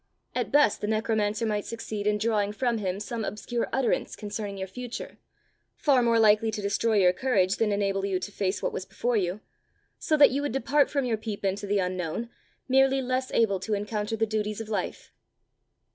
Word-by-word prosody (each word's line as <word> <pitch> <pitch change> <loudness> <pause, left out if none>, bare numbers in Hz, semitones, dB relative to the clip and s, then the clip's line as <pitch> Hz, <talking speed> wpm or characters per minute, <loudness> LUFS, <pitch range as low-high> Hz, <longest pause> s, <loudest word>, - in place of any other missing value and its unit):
At - - -2
best 290 -7 +4
the 210 - -2
necromancer 215 0 0
might 210 -2 -1
succeed 215 -2 -5
in 210 0 +2
drawing 210 -1 0
from 235 0 0
him 190 -1 -2
some 225 +2 -4
obscure 230 +4 -3
utterance 265 -2 0
concerning 205 -1 -5
your 190 0 -4
future, 245 +5 -7 0.6
far 275 -4 +3
more 235 -1 +3
likely 220 0 +5
to 215 0 -3
destroy 215 +3 +1
your 180 -2 +5
courage 195 -5 +1
than 220 -2 +1
enable 195 -1 0
you 195 -2 0
to 205 - -6
face 195 -1 -2
what - - -1
was - - -3
before 230 +6 -2
you; 190 0 -1 0.6
so 310 - +1
that 290 - +7
you 275 +2 0
would 290 -4 -2
depart 275 +2 +2
from 280 -3 0
your 230 -3 0
peep 215 -2 -5
into 200 +1 -1
the 205 +1 +1
unknown, 185 +4 -2 0.4
merely 270 +1 +4
less 255 0 -1
able 200 -4 +2
to 210 +3 -1
encounter 210 +1 -2
the 225 0 +1
duties 215 -1 -2
of 225 -1 -6
life." 200 -4 -4
215 Hz, 195 wpm, -27 LUFS, 200-235 Hz, 0.6 s, that